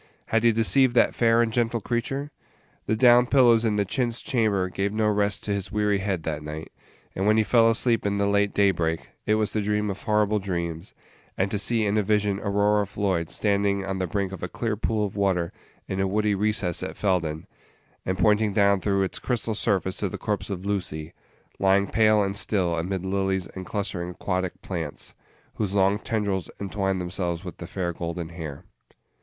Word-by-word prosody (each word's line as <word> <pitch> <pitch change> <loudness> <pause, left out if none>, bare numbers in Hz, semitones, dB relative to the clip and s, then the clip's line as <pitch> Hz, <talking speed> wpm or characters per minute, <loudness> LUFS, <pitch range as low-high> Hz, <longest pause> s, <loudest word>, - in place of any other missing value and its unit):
Had 115 - +2
he 115 - +6
deceived 120 +3 +3
that - - +4
fair 115 0 +3
and 115 -1 -2
gentle 115 -1 +1
creature? 135 +6 -3 0.6
The 110 - +2
down 120 +1 +6
pillows 120 -4 +5
in 110 -2 +1
the 100 -1 +1
chintz 120 +2 -2
chamber 105 -7 +1
gave 95 +2 -2
no 110 0 +1
rest 105 -1 0
to 105 - -1
his 100 -1 -4
weary 105 -1 +1
head 95 -4 -2
that 75 -1 -3
night; 75 +1 -7 0.4
and 95 +2 -1
when 110 +1 +4
he 110 - +4
fell 115 +1 +4
asleep 115 0 +2
in 100 0 0
the 100 - +1
late 100 0 +2
daybreak, 85 -7 +1 0.2
it 105 - +4
was 110 -1 0
to 110 - -1
dream 105 0 0
of 100 - -8
horrible 105 -1 +1
dreams, 85 -2 -4 0.4
and 95 +1 0
to 105 - -1
see 110 +2 +1
in 105 +1 +2
a - - +3
vision 105 -1 +1
Aurora 105 0 +1
Floyd 95 -5 -1
standing 100 -1 +1
on 95 -1 -3
the 95 - -1
brink 100 +1 -2
of 95 - -8
a 90 - -2
clear 110 +4 -2
pool 105 0 0
of 100 - -6
water 95 -4 0 0.3
in 95 - -3
a 95 - +1
woody 105 +2 +1
recess 100 -3 0
at - - -5
Felden, 85 -6 -1 0.6
and 95 0 -2
pointing 105 +1 +3
down 100 -1 +3
through 100 0 +1
its 95 - -3
crystal 115 -3 -1
surface 100 -3 0
to 100 - -1
the - - -6
corpse 105 -1 -3
of 95 -1 -5
Lucy, 85 -6 -3 0.5
lying 95 +1 +3
pale 110 0 +3
and 100 0 -2
still 95 -4 0
amid 90 +3 -3
lilies 95 -1 0
and 95 +1 -8
clustering 95 -4 -3
aquatic 90 0 -3
plants, 80 -6 -5 0.4
whose 100 -2 -2
long 100 +1 +3
tendrils 100 -5 -2
entwined 95 -1 -1
themselves 90 0 -3
with 90 - -7
the 85 - -8
fair 90 -2 -3
golden 85 0 -5
hair. 80 -5 -7
100 Hz, 195 wpm, -25 LUFS, 95-105 Hz, 0.6 s, he